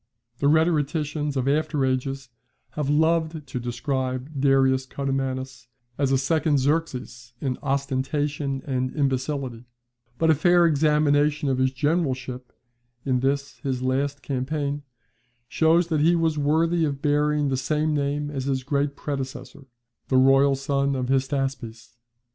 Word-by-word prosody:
The 140 - +2
rhetoricians 150 -2 +1
of 130 0 -1
after 150 -1 +1
ages 130 0 -2 0.4
have 150 -2 -3
loved 160 0 +1
to 130 -2 -5
describe 130 +2 -3
Darius 135 -1 +3
Codomannus 130 -2 -3 0.3
as 140 -2 +1
a 135 - +4
second 155 +2 +1
Xerxes 130 -5 -2
in 130 -3 -3
ostentation 140 0 -2
and 130 -2 -2
imbecility; 135 -3 -2 0.5
but 160 -1 +3
a - - +6
fair 175 +3 +4
examination 150 -1 +2
of 130 -1 0
his 130 0 +2
generalship 130 -4 -2 0.5
in 130 -2 +1
this 140 +2 -1
his 130 -3 -3
last 140 +2 -1
campaign, 140 +2 -2 0.7
shows 165 +5 +2
that 155 -3 +1
he 170 +3 +4
was 165 -2 +1
worthy 160 +3 +1
of 140 -2 -2
bearing 150 0 +2
the 135 - 0
same 150 +4 0
name 145 0 -1
as 135 -3 -4
his 135 -1 -1
great 140 +1 -1
predecessor, 135 -1 -6 0.4
the 130 - +2
royal 135 +1 +5
son 140 0 0
of 130 -1 -2
Hystaspes. 130 -4 -2
140 Hz, 135 wpm, -24 LUFS, 130-150 Hz, 0.7 s, a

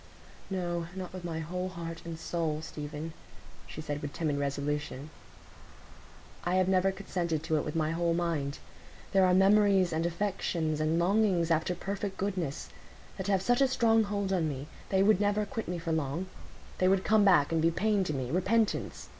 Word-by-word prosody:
"No, 175 -3 -2
not 185 -1 -6
with 185 -1 -7
my 165 -2 -3
whole 180 +3 -3
heart 165 -2 -6
and 165 -1 -5
soul, 160 -2 -2
Stephen," 150 +1 -6 0.5
she 155 - -7
said 145 -1 -4
with 145 -1 -5
timid 155 -4 -1
resolution. 145 0 -3 1.3
"I 175 +1 0
have 185 -1 +3
never 190 0 +3
consented 175 -5 -2
to 160 0 +1
it - - 0
with 150 - -5
my 155 -1 +1
whole 170 0 +1
mind. 160 -5 -1 0.5
There 190 -1 +5
are 180 - +4
memories, 195 -2 +4
and 160 +1 0
affections, 170 -4 -1
and 155 +1 +1
longings 180 -2 +2
after 165 +2 +1
perfect 195 +1 -4
goodness, 185 -8 -3 0.5
that 190 - -4
have 195 -2 +2
such 245 +5 +2
a 270 - +6
strong 225 -4 +3
hold 200 -1 -1
on 165 -4 +1
me; 140 -1 -5 0.2
they 190 0 +3
would 210 -1 +4
never 205 +1 +2
quit 225 +2 -5
me 180 - -2
for 165 0 -3
long; 160 +2 -1 0.5
they 185 - +4
would 190 0 +3
come 215 -1 +4
back 175 -8 +5
and 165 -1 +2
be 165 - +4
pain 205 +3 +1
to 155 - -2
me—repentance. 185 - 0
175 Hz, 180 wpm, -30 LUFS, 160-195 Hz, 1.3 s, a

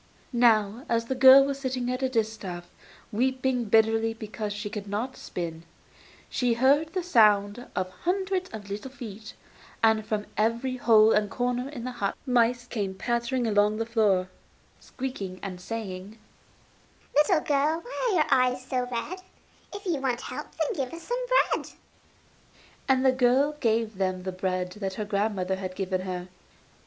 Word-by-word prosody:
Now, 230 -1 +3
as 230 0 +1
the 265 - -2
girl 265 +1 +8
was 275 0 -3
sitting 255 -2 -2
at 255 +1 -3
her 265 - +2
distaff, 215 -7 -3 0.4
weeping 255 +1 0
bitterly 225 +1 +3
because 215 -1 -5
she 210 +1 -4
could 205 -1 -6
not 225 +6 -3
spin, 165 -2 -6 0.7
she 245 -2 0
heard 285 +6 +3
the 370 - -1
sound 210 - +3
of 185 0 -2
hundreds 375 +1 -1
of 210 -2 -8
little 205 +6 -5
feet, 220 -5 -9 0.5
and 220 -1 +4
from 210 -1 -2
every 235 +4 0
hole 220 -3 +6
and 210 -2 +2
corner 245 +3 -1
in 265 -5 -7
the 255 - -3
hut 205 -5 -2
mice 240 -1 +2
came 205 -6 -3
pattering 235 +4 -1
along 210 -1 +2
the 225 - -1
floor, 210 -5 +2 0.5
squeaking 205 -8 -6
and 185 -2 -6
saying: 200 -1 -6 1.0
'Little 310 +3 +4
girl, 300 +3 +1
why - - -2
are 405 - +1
your 310 -3 +3
eyes 255 0 +2
so 250 -1 -1
red? 320 +10 -4 0.5
If 405 0 -8
you 345 -5 0
want 255 -3 -1
help, - - -6
then 380 - 0
give 255 - -8
us 335 - -10
some - - -2 0.3
bread.' - - -4 1.2
And 265 0 +3
the 260 - +6
girl 260 +3 +3
gave 225 -4 0
them 185 -1 -1
the 185 - -3
bread 185 -1 -2
that 195 -1 -5
her 210 - -3
grandmother 200 -2 -1
had 185 -1 -5
given 185 -1 -2
her. 180 -1 -5
230 Hz, 165 wpm, -27 LUFS, 205-260 Hz, 1.2 s, girl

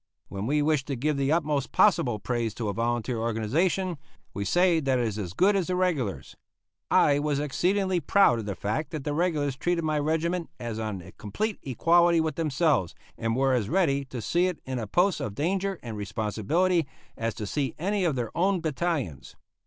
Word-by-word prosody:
When 100 +2 -4
we 150 +2 +2
wish 150 -2 +2
to 140 - -3
give 150 +5 0
the 140 +1 +1
utmost 150 -4 0
possible 165 - +3
praise 115 0 -2
to 110 -3 -3
a - - -2
volunteer 120 +2 -1
organization, 150 - 0 0.3
we 100 - -3
say 175 - +3
that 135 -4 +1
it 120 - +1
is 110 -1 -4
as 90 -4 -5
good 200 - +3
as 190 -4 0
the 185 - 0
regulars. 145 - -1 0.5
I 145 0 +4
was 145 -1 0
exceedingly 185 +6 +1
proud 170 -9 +4
of 105 - -6
the 100 - -3
fact 110 - -2
that 155 -4 -5
the 145 - -2
regulars 150 -4 0
treated 170 +4 -1
my 155 -1 0
regiment 160 +3 -1
as 115 -2 -4
on 105 -5 -4
a - - -12
complete 210 - -4
equality 170 +6 +3
with 160 -1 0
themselves, 155 - +1 0.2
and 115 0 -1
were 135 +1 +2
as 115 -5 0
ready 150 -7 +2
to 125 -4 -7
see 175 - +2
it 180 -3 -3
in 130 -1 -3
a 110 - -4
post 180 - +2
of 100 -2 -4
danger 190 - -1
and 115 -3 -6
responsibility 110 - 0 0.3
as 115 -2 -3
to 105 - -5
see 135 +6 -2
any 195 +4 0
of 165 -6 +1
their 120 -3 -4
own 190 +2 +2
battalions. 150 - -3
145 Hz, 200 wpm, -27 LUFS, 115-175 Hz, 0.5 s, I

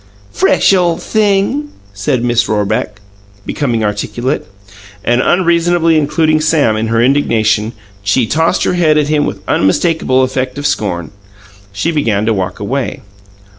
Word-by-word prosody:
"Fresh 190 - +3
ole 175 -3 +2
thing!" 210 +9 0 0.2
said 115 +5 -1
Miss 120 -1 +1
Rorebeck, 105 0 -1 0.5
becoming 120 -6 -1
articulate. 120 +5 -2 0.6
And 120 +1 +2
unreasonably 170 -1 +2
including 155 +1 +1
Sam 150 -8 +2
in 110 +1 -1
her 115 +1 +1
indignation, 115 -5 +1 0.3
she 100 +5 +1
tossed 160 +8 +1
her - - +1
head 160 -4 +2
at 150 -1 +1
him 150 -1 +1
with 100 - -4
an 95 - -2
unmistakable 130 - +2
effect 130 0 -2
of 145 - -5
scorn. 90 - -2 0.6
She 100 - -1
began 110 -10 0
to 110 - +2
walk 90 -2 -3
away. 130 +6 -3
130 Hz, 140 wpm, -14 LUFS, 110-165 Hz, 0.6 s, Fresh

